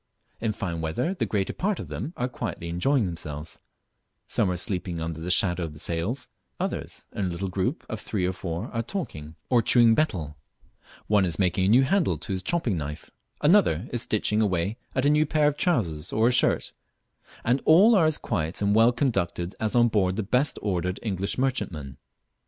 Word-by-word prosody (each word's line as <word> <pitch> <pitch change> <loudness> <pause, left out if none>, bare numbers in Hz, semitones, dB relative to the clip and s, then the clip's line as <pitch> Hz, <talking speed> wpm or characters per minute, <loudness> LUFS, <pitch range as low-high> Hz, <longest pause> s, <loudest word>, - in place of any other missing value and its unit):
In 110 -1 0
fine 85 -5 -4
weather 80 - -1
the 195 - -2
greater 100 -3 -1
part 200 +1 -1
of - - -6
them 165 - -5
are 125 - 0
quietly 85 -8 -5
enjoying 115 +9 +1
themselves 80 -3 -5 0.7
some 100 - +1
are 90 - -1
sleeping 90 -3 -3
under 80 0 -4
the 85 - -4
shadow 90 -1 +2
of 80 -2 -5
the - - -12
sails; 85 - -2 0.3
others, - - -4
in 95 -3 -2
little 90 +2 -3
groups 95 - -2
of 110 - -5
three 95 -4 -2
or 90 - 0
four, 90 +3 -5
are 115 - 0
talking 85 - -6
or 120 -2 +4
chewing 115 0 +5
betel; 85 - -1 0.7
one 105 -2 +3
is 85 -4 0
making 95 0 +1
a - - +2
new 125 +5 +6
handle 180 +4 +1
to 105 - -7
his 95 - -2
chopping 125 - 0
knife, 75 -1 -6 0.3
another 150 - +4
is 120 - +1
stitching 105 0 0
away 95 +1 0 0.2
at 130 +1 +1
a - - +5
new 150 0 +3
pair 150 0 +2
of 145 - +1
trousers 90 - 0
or 110 +2 +3
a - - +2
shirt, 125 - +2 0.7
and 125 +4 +2
all 190 +9 +7
are 175 -7 +5
as 155 - +1
quiet 85 -6 -3
and 100 0 +2
well 115 +3 +6
conducted 95 -8 -1
as 110 +1 -1
on 120 -1 +5
board 95 -5 +1
the 110 - -1
best 125 +7 +1
ordered 90 -2 -1
English 100 -3 -2
merchantman. 100 - -2
100 Hz, 195 wpm, -26 LUFS, 85-125 Hz, 0.7 s, all